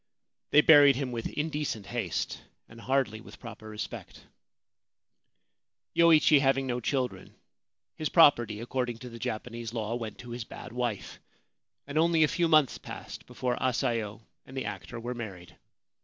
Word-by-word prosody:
They 150 - +6
buried 145 -3 +7
him 130 -1 -3
with 115 -2 -3
indecent 150 -8 -3
haste, - - -3 0.3
and 115 +1 -13
hardly 130 -5 0
with - - -14
proper 115 -2 -10
respect. 105 0 -8 1.7
Yoichi 160 -3 +6
having 135 -1 +2
no 125 -1 -2
children, 125 -6 -3 0.6
his 155 - -2
property, 120 -10 +5
according 120 -1 -2
to 125 +1 -9
the 115 0 -10
Japanese 115 +1 -5
law, 110 0 -2
went 115 -3 -5
to 120 -1 -10
his 120 0 -4
bad - - -10
wife, 120 -7 -3 0.7
and 145 +2 -1
only 165 -1 +4
a - - +5
few 170 +2 +1
months 155 -5 +4
passed - - -9
before 125 -1 -2
Asayo 115 -4 -1 0.2
and 130 - -11
the 130 - -2
actor 120 - -6
were 120 +2 -4
married. 100 -7 -8
125 Hz, 150 wpm, -29 LUFS, 115-140 Hz, 1.7 s, buried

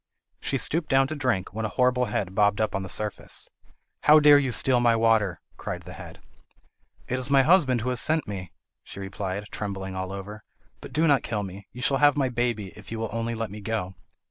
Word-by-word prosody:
She 135 - -1
stooped 160 +5 +1
down 135 0 +4
to 155 - -3
drink, 125 -11 -1
when 110 +2 -4
a - - 0
horrible 125 +1 +2
head 95 -5 -3
bobbed 100 0 +2
up 110 - 0
on 95 - -1
the 95 - -6
surface. 105 +2 -1 0.5
"How 155 +1 +7
dare 145 -1 +7
you 135 -3 -1
steal 125 +1 +3
my 120 -1 +3
water?" 110 -7 +2 0.2
cried - - -5
the - - -10
head. - - -11 0.9
"It 130 - -2
is 130 +1 -2
my 135 -1 +5
husband 145 -7 +4
who 125 - -2
has 125 -1 +3
sent 160 0 +1
me," 95 -4 -6 0.3
she - - -10
replied, 95 0 -4
trembling 95 -2 -5
all 95 0 -4
over. 105 +2 -8 0.4
"But - - -11
do 155 +5 +2
not 140 -5 +4
kill 105 -3 -3
me! 95 +1 -9
You 125 - -8
shall 135 - +3
have 145 0 +4
my 135 -3 +1
baby, 120 -5 -2
if 105 - -13
you 115 - -4
will 110 -1 -3
only 115 +1 -2
let 115 -2 -4
me 105 +1 -8
go." 100 -3 -3
115 Hz, 220 wpm, -26 LUFS, 100-130 Hz, 0.9 s, How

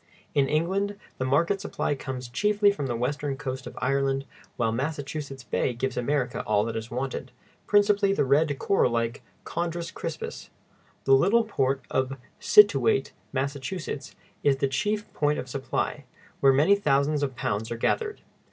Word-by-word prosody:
In 140 -2 +2
England 195 +6 0 0.2
the 130 - 0
market 170 +9 +2
supply 205 - -1
comes 130 -2 -5
chiefly 205 - +3
from 145 -9 -3
the 120 - -2
western 135 +3 -2
coast 130 -2 -5
of 125 - -10
Ireland, 135 0 +1 0.3
while 115 -2 +1
Massachusetts 140 +1 -4
Bay 125 - 0
gives 130 +2 -2
America 125 0 0
all 105 0 +3
that 115 0 -4
is 110 +1 -4
wanted, 130 0 -4 0.4
principally 205 -1 +4
the 195 - +2
red, 145 +2 +3
coral 195 -8 +2
like 115 0 -1 0.2
Chondrus 170 0 -3
crispus. 165 -3 -6 0.5
The 135 - +4
little 195 +12 +5
port 135 - 0
of 130 +1 0 0.2
Scituate, 135 - +5 0.2
Massachusetts, 140 +3 -4 0.3
is 140 -2 +3
the 135 - +1
chief 210 +10 -1
point 150 0 +1
of 125 - -4
supply, 140 +2 -3 0.3
where 135 - +6
many 150 +9 +5
thousands 150 -5 +2
of 135 -3 -1
pounds 110 -1 -2
are 115 - -3
gathered. 425 - -1
140 Hz, 155 wpm, -27 LUFS, 130-170 Hz, 0.5 s, where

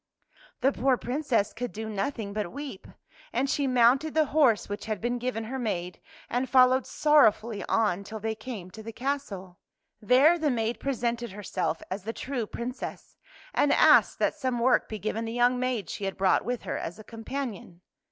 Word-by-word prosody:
The 265 +2 +4
poor 260 0 +2
Princess 245 -6 -1
could 245 +1 -4
do 220 +1 -6
nothing 210 0 -3
but 210 -4 -3
weep, 280 -8 -7 0.4
and 255 +4 0
she 280 0 0
mounted 255 +5 +3
the 315 -1 +4
horse 270 -9 +4
which 205 0 -5
had 215 -3 -2
been 240 +3 -1
given 240 -2 -2
her 260 +4 -5
maid 180 -7 -3 0.3
and 250 +1 -1
followed 255 0 +5
sorrow 295 -6 +5
fully 215 -1 -7
on 205 -4 +1
till 220 +2 -7
they 220 +1 -2
came 215 -5 -8
to 220 - -10
the 225 +1 -7
castle. 225 -9 -4 0.4
There 270 +10 +5
the 310 -2 +1
maid 230 -2 -1
presented 240 -4 -2
herself 200 -2 -3
as 195 +2 -3
the 225 +3 -4
true 250 -4 -4
Princess, 245 +4 -6 0.4
and 290 - +3
asked - - +5
that - - +1
some 255 -2 -2
work 245 +2 +2
be 215 - -4
given 215 +2 -3
the 225 - -4
young 245 +1 +3
maid 250 -7 -1
she 200 - -5
had 195 - -3
brought 190 -1 +3
with 245 +2 -3
her - - -3
as 175 - -6
a 215 - -11
companion. 225 -6 -6
235 Hz, 190 wpm, -27 LUFS, 210-260 Hz, 0.4 s, followed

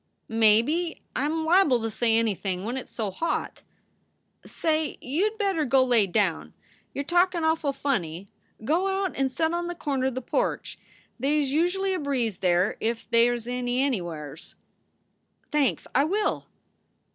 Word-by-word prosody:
" - - -49
Maybe. 230 +10 +3 0.2
I 265 - 0
m 320 +1 -1
liable 320 -7 +4
to 225 - -2
say 225 +1 +2
anything 195 -4 -1
when 235 +4 -3
it 265 - -4
s - - -14
so 215 -4 -3
hot." 330 - -3 0.8
"Say, 315 -2 -1
you 325 +12 0
d 435 - -15
better 390 -7 0
go 265 -1 +4
lay 240 -5 +3
down. 185 -3 -1 0.4
You 280 - -3
re - - -7
talkin 350 0 +2
awful 320 -2 +1
funny. 195 - -2 0.4
Go 340 +9 +1
out 385 -1 -1
and 270 -1 0
set 320 +4 0
on 345 0 -2
the 350 - -4
corner 275 -5 -1
the 260 0 -5
porch. - - -2 0.4
They 285 +4 +1
s 285 -2 0
usurally 360 +5 +1
a 370 - -1
breeze 250 - -1
there 180 +1 +2
if 230 +1 -2
they 235 +1 +5
s 240 -2 -3
any 245 0 -2
anywhurs." 170 - -4 1.0
"Thanks, 270 - +1
I 275 - +3
will." 410 +6 -1
265 Hz, 170 wpm, -26 LUFS, 225-325 Hz, 1.0 s, they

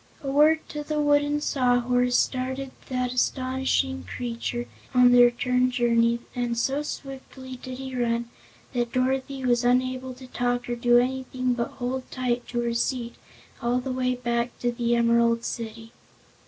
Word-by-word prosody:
A 275 - -2
word 305 +3 +4
to 300 0 -5
the 305 0 -2
wooden 290 0 +2
Sawhorse 245 -2 +2
started 260 +1 -1 0.2
that 250 -1 -1
astonishing 255 - 0
creature 240 - -4 0.3
on 250 0 +7
the 245 0 +7
return 250 +1 +3
journey, 235 -1 +2
and 240 -1 -1
so 270 +5 0
swiftly 265 -2 -8
did 255 0 -8
he 265 -1 -6
run 235 -1 0 0.5
that 240 -1 -1
Dorothy 260 +1 -1
was 240 0 +2
unable 255 +1 +1
to 260 - -12
talk 245 -1 -1
or 240 - -2
do 240 0 +4
anything 255 0 0
but 240 +2 -2
hold 255 0 -3
tight 245 -2 -2
to 240 -1 -2
her 235 0 -1
seat 235 0 -1 0.5
all 240 +1 +1
the 260 +1 -4
way 255 0 0
back 235 -1 -2
to 240 - 0
the 235 0 0
Emerald 235 0 +3
City. 225 0 -6
250 Hz, 155 wpm, -26 LUFS, 240-260 Hz, 0.5 s, on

